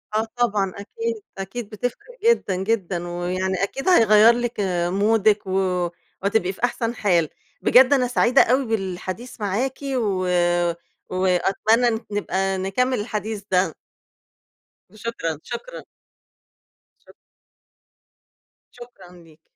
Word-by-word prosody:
آه 220 +1 +1
طبعًا 205 -6 +1
أكيد. 455 - -4 0.2
أكيد 200 +3 -6
بتفرق 245 - -5
جدًا، 460 - +3
جدًا. 185 -3 -2
ويعني 180 +2 -2
أكيد 270 - -2
هيغيّر 225 - +6
لِك 240 0 -2 0.3
مودِك 205 +2 +2
و 185 -2 0 0.3
وهتبقي 200 -2 +1
في 215 - -15
أحسن 235 -1 0
حال. 175 -8 +2 0.3
بجد 260 +2 +6
أنا 255 -3 +2
سعيدة 245 +1 +4
أوي 260 +3 +2
بالحديث 205 +2 -4
معاكِ 225 +7 -1 0.2
و 200 -6 0 0.8
وأتمنى 190 +6 +2
إن 225 -2 0
نبقى 195 -1 -1
نكمّل 230 +6 0
الحديث 210 -1 -4
ده. 180 -3 +2 1.2
شكرًا، 205 -9 -4
شكرًا. - - -7 1.2
شك - - -19 1.6
شكرًا 240 -7 -14
ليكِ. 160 -1 -21
210 Hz, 105 wpm, -22 LUFS, 185-240 Hz, 1.6 s, هيغيّر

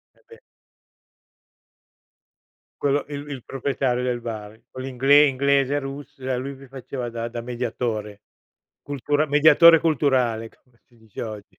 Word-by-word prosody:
Eh, - - -29
beh. 460 - -15 2.4
Quello 145 0 +1
il 145 0 -7
il 135 -4 -7
proprietario 135 -2 -1
del 125 -1 -2
bar, 110 -2 -7
con 130 - -9
l'ingle 135 +3 +4
inglese, 140 +1 +1
russ 135 0 -8
e 130 0 -2
lui 135 +2 -5
vi 135 +1 -14
faceva 130 -2 -6
da 115 0 -4
da 120 0 -6
mediatore. 115 -4 -4 0.6
Cultura 145 +2 -1
mediatore 155 +3 +7
culturale, 130 -8 +1
come 125 -3 -32
si 120 - -26
dice 110 -3 -11
oggi. 105 -3 -10
130 Hz, 135 wpm, -23 LUFS, 120-140 Hz, 2.4 s, mediatore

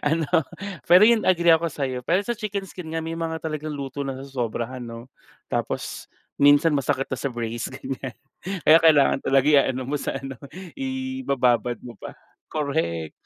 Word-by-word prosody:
ano, 160 0 +1 0.6
pero 180 +10 +7
'yun 230 -2 +4
agree 170 -2 +5
ako 165 0 0
sa'yo. 130 -3 -3
Pero 175 +8 +2
sa 240 - 0
chicken 200 -2 -4
skin 175 -3 -9
nga 165 - 0
may 165 0 -4
mga 165 -1 -3
talagang 155 -1 -4
luto 140 +1 -4
nasosobrahan 130 -2 -4
'no? 115 +1 -8 0.4
Tapos - - -4 0.2
minsan 145 +2 +5
masakit 135 -1 0
na - - 0
sa 140 - -2
brace 120 0 -4
ganyan. 130 -2 -6 0.5
Kaya 160 +1 +9
kailangan 150 -4 +5
talaga 135 +1 +3
iaano 135 -3 +3
mo 145 - -3
sa 135 - -2
ano, 135 0 -7 0.4
ibababad 260 - 0
mo 120 -2 -9
pa, - - -10 0.4
korek. 85 - -2
140 Hz, 160 wpm, -24 LUFS, 130-165 Hz, 0.6 s, Kaya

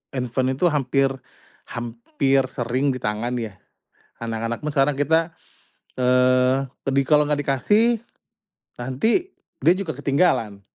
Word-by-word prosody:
handphone 130 +1 -1
itu 175 +6 +2
hampir 135 -1 +1 0.6
hampir 125 +4 -1
sering 125 +4 -1
ditangan 115 0 -3
ya. 105 -5 -6 0.7
Anak-anak 115 +1 -3
pun 150 - -2
sekarang 140 +1 +3
kita, 160 +3 +2 0.7
eee, 125 +1 +3 0.2
ke - - +3
di 140 - +4
kalau 150 -1 +4
gak 150 - +2
dikasih, 210 - +2 0.8
nanti 220 - 0 0.4
dia 170 - +7
juga 175 -6 -3
ketinggalan, 140 - +1
135 Hz, 115 wpm, -23 LUFS, 120-150 Hz, 0.8 s, dia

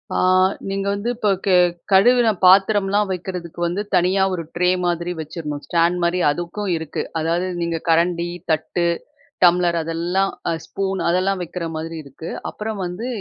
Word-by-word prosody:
ஆ - - +1 0.5
நீங்க 195 0 -2
வந்து 205 +4 -2
இப்ப 215 -3 0 0.2
கே 190 -2 +4 0.4
கழுவுன 240 +5 +5 0.2
பாத்திரம்லாம் 200 +2 +4
வைக்கிறதுக்கு 180 -2 -5
வந்து 175 +4 -1
தனியா 185 +2 +3
ஒரு 170 -2 -3
ட்ரே 180 +1 +2 0.2
மாதிரி 175 0 -1
வச்சுறணும். 150 -2 -5
ஸ்டாண்ட் 170 +1 +2
மாரி 170 +1 +1
அதுக்கும் 175 +6 -3
இருக்கு. 160 -2 -4 0.2
அதாவது 170 +3 0
நீங்க 170 -1 -1
கரண்டி, 170 +1 +2 0.2
தட்டு, 160 +2 0 0.6
டம்ளர் 175 -1 +3
அதெல்லாம் 175 +4 -1 0.2
அ - - 0
ஸ்பூன் 195 -1 -3
அதெல்லாம் 185 +2 +1
வைக்கிற 170 +1 -5
மாதிரி 165 +1 -5
இருக்கு. 140 +4 -9 0.2
அப்புறம் 215 -1 -5
வந்து 180 +7 -5
180 Hz, 145 wpm, -21 LUFS, 170-195 Hz, 0.6 s, கழுவுன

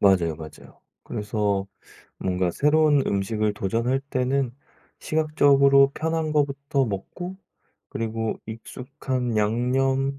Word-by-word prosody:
맞아요, 90 -5 +3
맞아요. 80 0 -12 0.2
그래서 105 -2 -1 0.5
뭔가 90 -1 0
새로운 150 - +3
음식을 105 +2 0
도전할 115 +7 0
때는 130 0 0 0.5
시각적으로 140 -3 +4
편한 160 -1 -1
것부터 140 -1 +1
먹고 130 - -5 0.5
그리고 115 0 -3
익숙한 125 +2 -4
양념 130 +5 +1
125 Hz, 250 characters per minute, -24 LUFS, 105-140 Hz, 0.5 s, 시각적으로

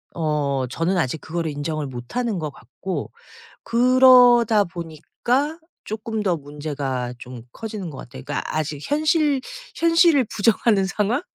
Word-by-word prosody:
어 145 -5 0
저는 165 +8 -1
아직 160 -2 -1
그거를 165 -1 -3
인정을 145 0 -3
못 120 - -9
하는 235 -7 -1
것 155 -1 -3
같고 135 +10 -6 0.5
그러다 245 -3 +6
보니까 185 - -3 0.3
쪼끔 215 0 -4
더 180 -4 +1
문제가 140 -4 -4
좀 125 -1 -9
커지는 210 -6 -6
것 140 - -10
같아요. 130 +1 -10
그러니까 145 - -3
아직 155 -2 -2
현실 300 -2 +2 0.3
현실을 330 -4 +4
부정하는 210 -2 +2
상황? 210 - 0
185 Hz, 285 characters per minute, -22 LUFS, 145-240 Hz, 0.5 s, 그러다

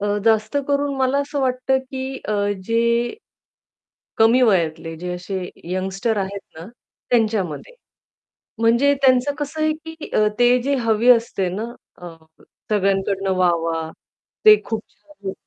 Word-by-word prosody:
अ, 205 0 0
जास्त 220 +2 +2
करून 285 0 0
मला 265 +1 +1
असं 285 0 -3
वाटतं, 260 0 +1
की 265 0 -6
अ, 215 - 0 0.3
जे 235 - +1 1.0
कमी 230 +3 +5
वयातले, 165 -7 +1
जे 180 +2 -5
असे 180 0 -5 0.2
यंगस्टर 190 +4 -1
आहेत 200 0 -3 0.2
ना, 165 - -9 0.4
त्यांच्यामध्ये. 220 - 0 0.8
म्हणजे 235 +5 +3
त्यांचं 260 +1 +3
कसं 295 +2 -4
आहे, 310 0 +2
की 320 0 -9
अ, 215 - +3
ते 245 +1 +5
जे 280 +2 0
हवी 225 +1 +2
असते 230 -6 +2
ना, 210 +3 -3 0.4
अ, 175 - -6 0.6
सगळ्यांकडनं 195 -1 +1
वाह, 180 -1 +3
वाह, 165 -1 -2 0.6
ते 430 0 +10
खूप 225 -2 -3
छान 240 -11 -9
230 Hz, 135 wpm, -21 LUFS, 195-265 Hz, 1.0 s, ते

